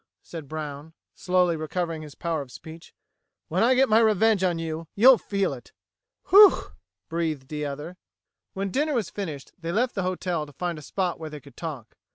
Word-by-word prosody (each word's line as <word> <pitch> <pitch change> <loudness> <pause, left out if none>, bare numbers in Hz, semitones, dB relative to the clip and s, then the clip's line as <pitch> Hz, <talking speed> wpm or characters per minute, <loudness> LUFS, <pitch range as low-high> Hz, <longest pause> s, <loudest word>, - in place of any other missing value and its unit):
said 160 -4 -8
Brown, 150 0 -6 0.2
slowly 180 -2 +1
recovering 160 +1 -3
his 150 -2 -10
power 165 -3 -2
of 135 -3 -10
speech. 160 +4 -12 0.5
"When - - 0
I 250 +3 +5
get 265 +1 +4
my 220 -1 +5
revenge 220 -2 +3
on 175 -2 +1
you, 165 0 -4
you'll 245 +4 +7
feel 195 -6 -1
it!" 125 -3 -12 0.6
"Whew!" 405 +1 +7 0.4
breathed 160 -5 -3
the 150 -1 -3
other. 150 +6 -7 0.6
When 195 0 -3
dinner 295 +4 0
was 225 -7 -1
finished, 155 -9 -6
they 165 -1 -4
left 240 +6 +1
the 195 - -2
hotel 180 -4 -2
to 145 - -14
find 170 +2 -3
a - - -11
spot 180 +4 -2
where 160 -1 -6
they 150 -1 -8
could 140 -2 -17
talk. 145 -9 -7
170 Hz, 190 wpm, -25 LUFS, 155-195 Hz, 0.6 s, you'll